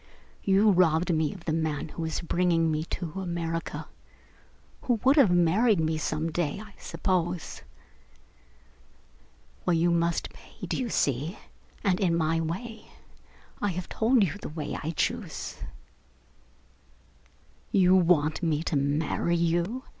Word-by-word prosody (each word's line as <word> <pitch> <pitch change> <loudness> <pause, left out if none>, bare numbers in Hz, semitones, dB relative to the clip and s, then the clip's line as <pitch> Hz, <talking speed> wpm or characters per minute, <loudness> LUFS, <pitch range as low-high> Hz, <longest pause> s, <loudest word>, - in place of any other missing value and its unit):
You 200 +2 +4
robbed 175 -1 +3
me 155 -2 +1
of 185 -4 -11
the 155 - 0
man 160 -2 -1
who 165 - -7
was 160 -1 -2
bringing 170 -1 +1
me 155 +1 -1
to 175 +2 -5
America 170 -2 -3 0.9
who 245 - +1
would 265 +2 +5
have 275 -10 +6
married 180 +5 +3
me 160 0 0
some 155 +1 -2
day, 160 0 -1
I 215 -1 -11
suppose. 180 -3 -2 2.0
Well, 180 - +2
you 170 +1 +3
must 170 0 0
pay, - - -11
do - - -2
you 250 -2 -2
see, 145 - 0 0.5
and 185 -2 +2
in 175 -4 +2
my 165 0 +1
way? 210 +8 -5 0.7
I 205 - +1
have 180 0 -5
told 230 0 +3
you 180 - 0
the - - -5
way 150 -1 -5
I 155 - -3
choose." 165 - -3 2.1
"You 185 -2 +5
want 165 -4 +3
me 160 -2 0
to 165 - -1
marry 145 +4 0
you?" 170 +9 0
170 Hz, 140 wpm, -27 LUFS, 160-190 Hz, 2.1 s, have